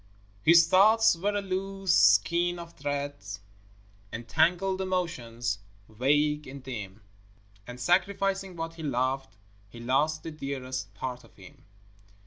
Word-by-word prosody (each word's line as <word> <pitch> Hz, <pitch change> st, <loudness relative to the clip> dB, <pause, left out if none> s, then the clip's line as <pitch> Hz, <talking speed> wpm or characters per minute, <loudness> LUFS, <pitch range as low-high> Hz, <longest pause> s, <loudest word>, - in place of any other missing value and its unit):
His 165 Hz, +4 st, +7 dB
thoughts 215 Hz, +2 st, +5 dB
were 200 Hz, +5 st, -1 dB
a 205 Hz, -, -1 dB
loose 195 Hz, 0 st, -1 dB
skein 170 Hz, -, +4 dB
of 170 Hz, -1 st, -9 dB
threads, 140 Hz, -9 st, -4 dB, 0.7 s
And 115 Hz, +1 st, -7 dB
tangled 180 Hz, +7 st, +2 dB
emotions, 120 Hz, -, -2 dB, 0.3 s
vague 150 Hz, +6 st, +1 dB
and 135 Hz, 0 st, -9 dB
dim; 105 Hz, -5 st, -7 dB, 0.6 s
And 125 Hz, 0 st, -8 dB
sacrificing 195 Hz, +5 st, +1 dB
what 165 Hz, 0 st, -5 dB
he 165 Hz, -, -10 dB
loved 135 Hz, -2 st, -2 dB, 0.3 s
He 120 Hz, -, -12 dB
lost 140 Hz, +6 st, 0 dB
the 165 Hz, -, -6 dB
dearest 130 Hz, -7 st, -5 dB
part 125 Hz, +3 st, -5 dB
of -, -, -20 dB
him. 95 Hz, -3 st, -16 dB
150 Hz, 125 wpm, -28 LUFS, 125-180 Hz, 0.7 s, His